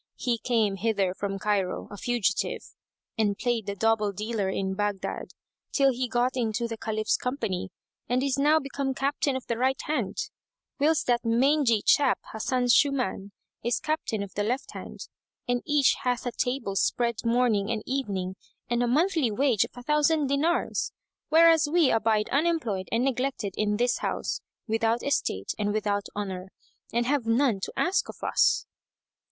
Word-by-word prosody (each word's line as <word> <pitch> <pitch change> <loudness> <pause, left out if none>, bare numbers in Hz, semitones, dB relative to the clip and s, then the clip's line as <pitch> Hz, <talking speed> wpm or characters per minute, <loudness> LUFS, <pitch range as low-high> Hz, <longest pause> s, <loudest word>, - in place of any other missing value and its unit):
He 240 -2 -1
came 220 -5 +1
hither 200 -3 0
from 195 0 -3
Cairo, 195 -2 -1
a - - -6
fugitive, 210 -2 -1 0.5
and 205 -2 +2
played 235 -4 -1
the 200 - -2
double 215 0 +2
dealer 210 0 -2
in 190 0 -2
Baghdad, 205 -1 -3 0.4
till 275 -2 +4
he 250 +1 -2
got 245 +2 0
into 235 -1 -1
the 230 - -4
Caliph's 215 -1 -1
company 225 -9 -3 0.4
and 250 +2 +1
is 275 -2 +1
now 300 +3 +5
become 275 -1 -3
captain 280 0 0
of 260 - -4
the 235 -1 -2
right 265 +1 +1
hand, 265 -10 -2 0.6
whilst 310 +2 +2
that 240 -1 +1
mangy 240 -1 +3
chap 280 -3 +4 0.2
Hasan 245 +3 0
Shuman 250 -7 +2 0.3
is 240 0 +1
captain 305 -9 -2
of 200 - -9
the 205 - -2
left 250 +6 -2
hand, - - -8 0.4
and 245 0 +1
each 295 -3 +4
hath 245 -1 -1
a 245 - -1
table 245 -5 -2
spread 235 +3 0
morning 230 -4 +2
and 220 -2 -2
evening 195 -9 -2 0.3
and 240 0 0
a 245 - +2
monthly 310 +1 +2
wage 240 -1 +2
of - - -16
a 245 - -8
thousand 300 +2 +2
dinars; 285 +5 0 0.4
whereas 325 -1 +6
we 335 -5 +4
abide 220 -1 +2
unemployed 280 - 0
and 230 +2 +1
neglected 255 -6 -1
in 210 -1 0
this 245 +2 +1
house, - - -2 0.3
without 225 +1 +1
estate 280 - -1
and 205 0 0
without 205 -1 -1
honour, 190 -2 -4 0.4
and 235 +1 +1
have 270 -3 0
none 230 -2 +2
to - - -5
ask 360 +2 +1
of - - -10
us." - - +3
235 Hz, 165 wpm, -27 LUFS, 210-270 Hz, 0.6 s, whereas